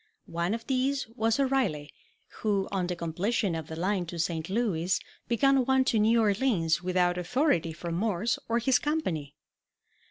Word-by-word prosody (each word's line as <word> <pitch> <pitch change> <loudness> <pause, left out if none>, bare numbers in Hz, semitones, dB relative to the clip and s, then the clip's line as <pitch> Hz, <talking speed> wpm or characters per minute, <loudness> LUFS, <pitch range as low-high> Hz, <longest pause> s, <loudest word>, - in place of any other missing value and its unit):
One 170 +5 -1
of 230 - -8
these 265 +1 0
was 225 +1 0
O - - +4
Reilly, 195 - 0 0.5
who, 200 -3 0
on 190 -3 -1
the 180 - -2
completion 175 +4 -1
of 160 -2 -4
the 160 - -6
line 185 +1 -1
to 170 - -6
St. 165 0 -2
Louis, 190 -5 0 0.3
began 270 +3 +3
one 265 +1 +3
to 225 - +2
Now 225 +2 +4
Orleans, 200 -7 +1
without 180 -1 +1
authority 180 - +1
from 170 +1 -5
Morse 210 +4 0
or 230 - +2
his 245 +2 +3
company. 170 - -2
200 Hz, 165 wpm, -28 LUFS, 170-240 Hz, 0.5 s, O